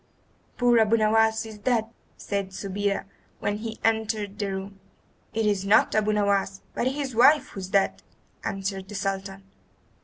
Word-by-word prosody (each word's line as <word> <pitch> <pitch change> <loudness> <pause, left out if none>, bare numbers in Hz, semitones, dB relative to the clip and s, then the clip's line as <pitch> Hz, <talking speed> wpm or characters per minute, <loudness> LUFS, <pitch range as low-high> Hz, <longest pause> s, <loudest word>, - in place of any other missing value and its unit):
"Poor 240 -1 +4
Abu 220 +1 +4
Nowas 220 +1 +3
is 215 -1 -10
dead!" 225 0 +1 0.3
said 200 -2 -3
Subida 200 +1 -2 0.3
when 205 0 -2
he 225 +1 -6
entered 220 -2 0
the 200 -2 -1
room. 195 +1 -6 0.5
"It 225 -1 -1
is 205 -2 +1
not 200 +2 +4
Abu 215 0 +2
Nowas, 200 -2 +1
but 245 - 0
his 270 -1 -2
wife 275 +6 +5
who - - -8
is 185 -1 -6
dead," 195 0 +1 0.4
answered 195 -1 -3
the 205 - -7
Sultan. 195 -1 -3
205 Hz, 155 wpm, -26 LUFS, 195-220 Hz, 0.5 s, wife